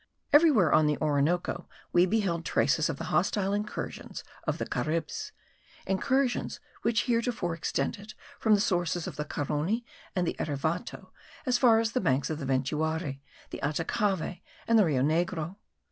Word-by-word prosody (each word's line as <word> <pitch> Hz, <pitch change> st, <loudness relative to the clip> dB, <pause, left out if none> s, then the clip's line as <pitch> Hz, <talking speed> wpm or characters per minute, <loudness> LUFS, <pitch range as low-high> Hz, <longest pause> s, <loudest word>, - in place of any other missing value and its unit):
Everywhere 290 Hz, -, +6 dB
on 155 Hz, -1 st, +5 dB
the 150 Hz, -, +1 dB
Orinoco 155 Hz, +3 st, 0 dB, 0.2 s
we 175 Hz, +1 st, +5 dB
beheld 185 Hz, -5 st, 0 dB
traces 155 Hz, 0 st, +2 dB
of 155 Hz, -, -3 dB
the -, -, -5 dB
hostile 195 Hz, +1 st, +1 dB
incursions 210 Hz, +1 st, -4 dB, 0.2 s
of -, -, 0 dB
the -, -, -2 dB
Caribs: 155 Hz, 0 st, -2 dB, 0.5 s
incursions 250 Hz, +7 st, 0 dB, 0.2 s
which 230 Hz, -2 st, +2 dB
heretofore 230 Hz, -7 st, 0 dB
extended 200 Hz, +5 st, -3 dB, 0.2 s
from 220 Hz, -2 st, +4 dB
the 200 Hz, -, +1 dB
sources 175 Hz, -5 st, 0 dB
of -, -, -6 dB
the 150 Hz, +1 st, -3 dB
Carony 155 Hz, -, -1 dB, 0.3 s
and 180 Hz, -2 st, +1 dB
the -, -, -1 dB
Erevato 155 Hz, +4 st, -3 dB, 0.3 s
as 250 Hz, -2 st, +2 dB
far 230 Hz, -3 st, +6 dB
as 225 Hz, 0 st, 0 dB
the 255 Hz, -, 0 dB
banks 140 Hz, -4 st, +1 dB
of 155 Hz, -, -3 dB
the 140 Hz, -, -4 dB
Ventuari, 145 Hz, +2 st, -1 dB, 0.3 s
the -, -, -5 dB
Atacavi, 175 Hz, +4 st, -1 dB, 0.3 s
and 230 Hz, -1 st, +5 dB
the 205 Hz, -, +6 dB
Rio 135 Hz, -6 st, +1 dB
Negro. 165 Hz, +3 st, 0 dB
175 Hz, 155 wpm, -29 LUFS, 155-215 Hz, 0.5 s, Everywhere